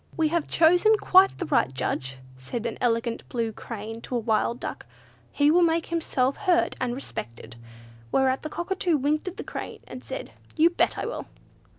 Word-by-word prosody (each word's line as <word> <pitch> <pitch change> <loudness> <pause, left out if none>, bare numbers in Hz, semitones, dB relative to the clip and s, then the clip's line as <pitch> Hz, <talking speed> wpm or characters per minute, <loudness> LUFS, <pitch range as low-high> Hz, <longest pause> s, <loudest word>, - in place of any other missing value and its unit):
"We 320 -2 +2
have 335 -1 0
chosen 355 +7 +5
quite 380 -1 +5
the 355 - -3
right 130 - +2
Judge," 130 0 -3 0.2
said 130 - -6
an 230 - -4
elegant 230 -1 0
blue 230 -2 -1
crane 225 +1 -7
to 250 - -5
a - - +2
wild 225 +2 0
duck; - - -6 0.4
"he 290 +1 +3
will 350 +2 +5
make 335 -1 +2
himself 280 -5 0
heard 370 -4 +2
and 245 -1 -1
respected." 120 - -7 0.6
Whereat 265 0 +2
the 310 - -5
Cockatoo 345 0 0
winked 295 +5 0
at 370 - -5
the - - -5
Crane, - - -7
and - - -9
said, - - -6 0.2
"You 330 +2 +5
bet - - +1
I - - -2
will!" - - -5
280 Hz, 185 wpm, -26 LUFS, 230-340 Hz, 0.6 s, chosen